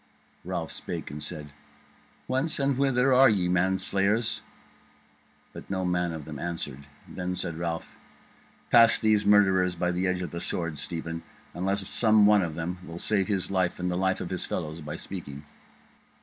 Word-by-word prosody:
Ralph - - -3
spake - - -5
and 75 +1 -7
said: 75 -4 -7 0.7
"Whence 135 +5 0
and 140 -1 +1
whither 135 -1 +3
are 130 +1 +7
ye, 100 -4 +1
ye 90 - 0
manslayers?" 95 +5 +1 1.1
But - - -10
no 95 -1 -1
man 90 -1 0
of 80 -3 -6
them 75 -3 -7
answered. 75 -5 -5 0.2
Then 90 0 -4
said 85 -3 -4
Ralph: 85 -1 -4 0.7
"Pass 115 -1 +7
these 105 -2 +2
murderers 95 -3 +4
by 90 +1 0
the 90 +1 0
edge 90 0 -1
of 90 - -5
the 85 - -4
sword, 80 -4 -2
Stephen; 80 +1 -4 0.3
unless 95 +2 -1
some 110 -2 +4
one 105 -1 +6
of 85 -4 -3
them 85 +2 -4
will 85 -2 -8
save 95 +1 +1
his 100 -2 -1
life 95 -2 0
and 90 0 -1
the - - -1
life 95 +1 0
of 90 - -5
his 90 - -1
fellows 80 -1 -4
by 75 0 -6
speaking." 75 -6 -8
90 Hz, 175 wpm, -27 LUFS, 85-100 Hz, 1.1 s, are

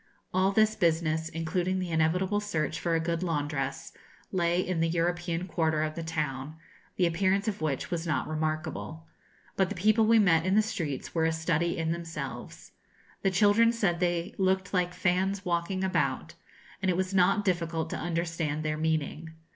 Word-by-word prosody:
All 185 +1 +3
this 215 +1 +3
business, 160 -2 +1
including 175 +3 -1
the 185 -2 -3
inevitable 180 +6 +1
search 165 -6 -2
for 170 0 0
a - - +2
good 165 +1 -1
laundress, 145 -5 -2 0.4
lay 175 -1 +1
in 185 -2 -1
the 165 0 +2
European 175 +1 -1
quarter 160 -3 +1
of 155 0 -2
the 165 - -5
town, 150 -3 -3 0.4
the 180 - +2
appearance 190 +4 +1
of 205 -6 -2
which 145 -4 -2
was 170 -1 -2
not 155 - 0
remarkable. 155 +1 -3 0.5
But 190 -1 +2
the 205 - -4
people 215 +4 +3
we 230 0 +6
met 170 -7 +4
in 190 +2 +1
the 215 - +5
streets 170 -11 -4
were 160 -1 +2
a 165 - +2
study 160 +1 0
in 160 0 -1
themselves. 170 -1 -6 0.5
The 195 - +2
children 205 +4 +4
said 195 -7 0
they 175 0 0
looked 190 0 +1
'like 180 -1 0
fans 190 +2 0
walking 175 +2 -1
about;' 190 - 0 0.5
and 190 - +1
it 175 - +1
was 190 +1 -1
not 195 +2 +3
difficult 170 -3 -1
to - - -2
understand 165 -2 -2
their 155 0 -1
meaning. 160 +1 -2
170 Hz, 175 wpm, -29 LUFS, 160-185 Hz, 0.5 s, we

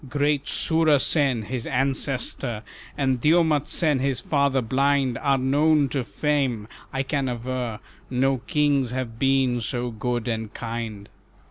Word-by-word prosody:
Great 145 0 +1
Soorasen, 145 -6 +3
his 120 +1 -5
ancestor, 130 -3 -1 0.3
And 130 -3 0
Dyoumatsen 155 -2 +2
his 135 -1 0
father 140 0 +1
blind 135 +1 +1
Are 140 -1 +2
known 145 +2 +3
to 130 0 -1
fame: 135 -6 -1 0.2
I 135 0 -1
can 135 -1 -1
aver 120 -2 -4 0.3
No 130 +1 +1
kings 145 -4 +2
have 120 -2 -4
been 135 -2 +2
so 120 +1 -3
good 120 +1 -3
and 110 -2 -3
kind." 115 -3 -5
130 Hz, 125 wpm, -24 LUFS, 120-140 Hz, 0.3 s, Soorasen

